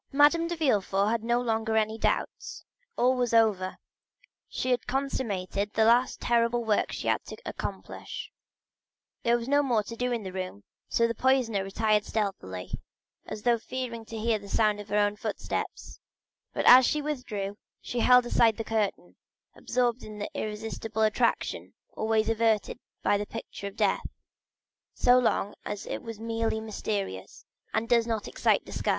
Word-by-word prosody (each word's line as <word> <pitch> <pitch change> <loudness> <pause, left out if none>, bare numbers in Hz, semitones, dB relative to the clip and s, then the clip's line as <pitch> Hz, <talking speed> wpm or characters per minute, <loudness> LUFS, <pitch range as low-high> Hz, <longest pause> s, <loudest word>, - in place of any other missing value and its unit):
Madame 295 +4 +5
de 345 - -2
Villefort 205 - +2
had 230 -1 -1
no 240 +1 +2
longer 225 -2 0
any 220 0 +1
doubt; 225 - -2 0.3
all 250 +1 +4
was 245 -2 +1
over—she 215 +4 -2
had 245 -2 0
consummated 210 -7 -2
the 220 - +3
last 240 +3 +3
terrible 235 0 +2
work 215 -2 +1
she - - -4
had - - +1
to - - -9
accomplish. - - -6 0.9
There 235 0 +3
was 235 0 -6
no 285 +1 +4
more 240 -6 +1
to 230 - -8
do 250 +1 -1
in 235 -3 -1
the 190 -1 -6
room, 185 - -5 0.3
so 230 - +3
the 230 - -2
poisoner 240 -5 +2
retired 210 +2 +1
stealthily, 190 - -3 0.6
as 210 - -6
though 240 -1 +3
fearing 245 -1 -5
to 225 - -7
hear 220 0 +1
the 200 0 -12
sound 210 0 +2
of 205 0 -9
her 205 - +1
own 205 0 +2
footsteps; - - -4 0.5
but - - -2
as 255 +1 +10
she 300 - +1
withdrew 215 -9 -3 0.2
she 245 - -4
still - - +2
held 250 -1 +7
aside 230 -2 +3
the 225 - -3
curtain, 215 -2 -2 0.4
absorbed 245 -1 0
in 215 -1 -9
the 205 - -5
irresistible 220 +1 -3
attraction 215 0 0 0.2
always 220 0 +1
exerted 225 -1 +1 0.2
by 205 - +3
the 205 - -4
picture 225 -3 -7
of 200 - -9
death, - - +1 0.9
so 250 0 +5
long 210 -4 +1
as 205 0 -5
it - - -4
is 225 -3 -8
merely 225 -1 -1
mysterious 205 - -4 0.3
and 220 +1 -1
does 235 -1 +3
not 225 -2 -2
excite - - +1
disgust. - - -3
225 Hz, 165 wpm, -28 LUFS, 210-240 Hz, 0.9 s, as